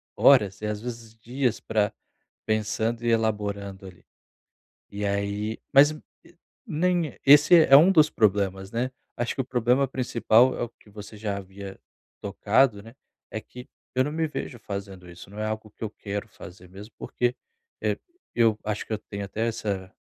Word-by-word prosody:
horas 105 -8 +4
e, - - -4
às 105 -1 -3
vezes, 115 -2 -8
dias 120 +1 -2
pra 105 -1 0 0.6
pensando 110 +2 -1
e - - 0
elaborando, 100 -3 -1
ali. 90 -2 -14 0.9
E 100 +1 -4
aí, 100 +2 -2
mas 145 +2 +7
o 155 - -9 0.7
nem 175 0 +1
é - - -17
esse 145 +5 +8
é 160 -5 +5
é - - +13
um 170 +6 +6
dos 155 -4 +5
problemas, 95 -3 0
né? 125 +3 -2 0.2
Acho 120 - -2
que - - 0
o - - -7
problema 125 +2 +2
principal 125 -1 +3
é - - -2
o 120 - -4
que 110 - -24
você 105 +1 -10
já 105 -2 -3
havia 95 0 -9 0.4
tocado, 105 +2 +2
né, 115 +3 -14 0.4
é 110 - -3
que 125 +2 -12 0.3
eu 130 - +3
não 145 - -3
me 160 +1 -1
vejo 145 -4 -6
fazendo 100 -3 -7
isso, 85 +1 -12
não 105 +2 -10
é 110 - -1
algo 110 0 -4
que - - -10
eu 110 - -2
quero 100 0 -6
fazer, 90 -3 -13
mesmo 100 +4 -12
porque, 125 0 -1 0.5
eh, - - 0 0.4
eu 115 -3 +3
acho 105 -1 -3
que - - -5
eu - - 0
tenho 100 -1 -7
até 110 +4 -2
essa 100 -4 -3
110 Hz, 185 wpm, -26 LUFS, 100-125 Hz, 0.9 s, é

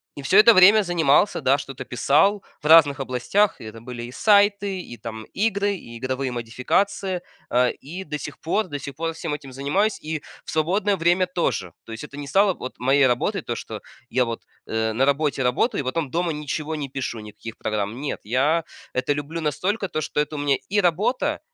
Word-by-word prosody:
и 145 - -7
всё 160 +8 +3
это 220 +2 +9
время 205 +3 +7
занимался, 175 +1 +2
да, 135 +2 +3
что-то 135 -2 -7
писал 190 +11 +2 0.2
в - - -16
разных 150 -3 +7
областях, 135 +11 +1
это 110 0 -9
были 120 0 -7
и 120 - -7
сайты, 200 +2 +3
и 145 -9 -8
там 110 -2 -7
игры, 200 -1 +1
и 115 -10 -10
годовые 130 +1 -2
модификации, 175 - -1 0.3
э, 125 0 +3
и 175 +7 -8
до 150 -3 -5
сих - - -8
пор, 185 +5 0
до 145 - -4
сих 140 0 -8
пор 165 +1 -2
всем 160 -1 -4
этим 140 -2 -7
занимаюсь 150 +11 0
и 155 -1 -3 0.2
в - - -6
свободное 190 +6 +1
время 175 +2 +3
тоже, 170 - -2
то - - -12
есть 110 +3 -7
это 145 -1 -10
не 145 -1 -6
стало 195 +4 +3
вот, 130 - -7
моей 135 +2 +4
работой, 170 - 0
то, 120 - -4
что 110 -2 -7 0.3
я 125 0 +2
вот, 115 -1 -5 0.2
э, 110 0 -1
на 130 +5 +2
работе 140 0 +1
работаю 125 - +1
и - - -6
потом 140 +1 -2
дома 170 +2 0
ничего 150 +1 -4
не 145 -3 -4
пишу, 130 -3 -4
никаких 110 +1 -10
программ. 105 +2 -3
Нет, 145 0 -3
я 145 +9 +1 0.3
это 130 +3 0
люблю 145 +3 -5
настолько, 190 +7 -1
то - - -2
что 150 - -2
это 150 +1 -1
у - - -4
меня 145 -1 +2
и 205 +2 +2
работа, 220 - +1
150 Hz, 205 wpm, -23 LUFS, 130-185 Hz, 0.3 s, это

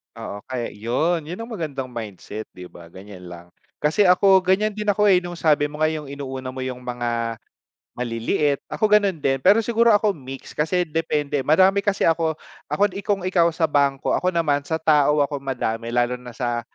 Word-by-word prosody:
Oo, 100 - -7
kaya 125 -2 -3
'yon. 150 +10 -1
'Yon 175 +6 -6
ang 235 - -10
magandang 140 - -4
mindset, 110 -1 -7
'di 90 -1 -10
ba, 85 -1 -13
ganyan 95 0 -12
lang, 85 0 -11 0.4
kasi 170 +6 +3
ako, 190 +1 +6
ganyan 195 +3 +1
din 210 0 -5
ako, 210 +1 +2
eh, 185 - +6
no'ng, 175 -1 -7
sabi 150 -3 +2
mo 150 - -9
nga, - - +5
yung 150 -3 -6
inuuna 135 -2 -6
mo 130 - -5
yung 125 -1 -5
mga, 120 -2 -3 0.6
maliliit. 125 +4 -1
Ako, 215 -1 0
gano'n 200 -4 +4
din, 135 -1 +1
pero 210 +7 +4
siguro 235 +1 +2
ako 210 -1 +4
mix, 135 -4 -10
kasi 175 +4 0
depende, 150 -3 -1
marami 185 +8 +4
kasi 200 0 0
ako 165 -1 +1 0.3
ako, 205 -1 +1
'di 195 - -5
kung 200 -2 -1
ikaw 175 -2 +3
sa 165 0 -1
bangko, 140 -3 +1
ako 180 - +1
naman, 145 -4 +2
sa 160 - 0
tao 150 -2 +3
ako 145 -1 -4
madami, 115 -4 -3
lalo 120 +1 +1
na 125 -2 -11
sa 120 -1 -1
150 Hz, 195 wpm, -22 LUFS, 125-180 Hz, 0.6 s, ako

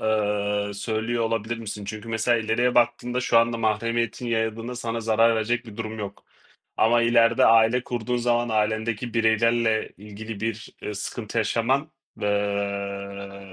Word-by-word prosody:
ııı, 105 -1 0
söylüyor 115 +2 -1
olabilir 115 +1 -2
misin? 105 -2 -6
Çünkü 110 +2 -7
mesela, 115 +1 +2
ileriye 115 +3 +1
baktığımda 120 +1 +2
şu 120 -2 +4
anda 115 0 +2
mahremiyetin 115 +2 -1
yayıldığında 115 +1 -2
sana 115 -1 -3
zarar 115 +1 +3
verecek 120 +3 -1
bir 110 -1 -11
durum 110 -1 -5
yok. 100 -1 -7 0.5
Ama 115 +1 +4
ileride 115 0 +4
aile 115 +2 +4
kurduğun 125 0 -2
zaman 120 0 +1
ailendeki 110 +2 -1
bireylerle 115 0 +2
ilgili 105 +1 -8
bir 115 0 -4 0.2
sıkıntı 110 +2 -4
yaşaman, 130 +7 +1 0.3
ııı, 100 -1 -3
110 Hz, 135 wpm, -25 LUFS, 105-115 Hz, 0.5 s, şu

